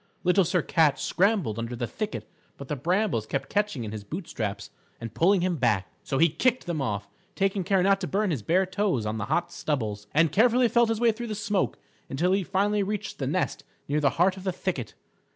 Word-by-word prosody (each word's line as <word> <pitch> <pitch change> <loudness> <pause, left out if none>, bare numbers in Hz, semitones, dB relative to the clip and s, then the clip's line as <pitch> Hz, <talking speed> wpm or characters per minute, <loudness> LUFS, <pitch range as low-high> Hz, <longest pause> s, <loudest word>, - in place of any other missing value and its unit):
Little 180 +1 +4
Sir 175 -1 +1
Cat 155 -4 +3
scrambled 185 - +1
under 115 +1 -4
the 120 0 -2
thicket 210 - -5 0.3
but 140 - -9
the 150 - -1
brambles 170 - 0
kept 135 - -3
catching 205 - 0
in 105 - -5
his 110 -2 -6
boot 165 - -6
straps 100 -2 -4 0.3
and 115 -2 -7
pulling 185 - +3
him 180 -1 0
back. 105 - +1
So 135 - -2
he 165 +4 +6
kicked 235 - 0
them 170 -4 -2
off, 105 -5 -2 0.3
taking 195 0 0
care 190 0 +2
not 195 0 +3
to 180 - -2
burn 200 0 0
his 140 -8 -2
bare 180 - +2
toes 185 - 0
on 110 +1 -2
the 105 - -2
hot 170 +9 0
stubbles, 110 -11 -3
and 160 0 +3
carefully 240 +5 +4
felt 235 -1 +3
his 225 -1 0
way 235 -1 +4
through 235 +2 -6
the 215 - -3
smoke 205 -1 -1 0.3
until 170 +7 +1
he 195 +1 +3
finally 200 +3 +1
reached 205 +1 -3
the - - -2
nest - - -1 0.2
near 145 +2 +1
the 145 -2 +3
heart 185 +3 +3
of 190 - -9
the 190 - 0
thicket. 175 -8 -4
175 Hz, 225 wpm, -27 LUFS, 125-200 Hz, 0.3 s, he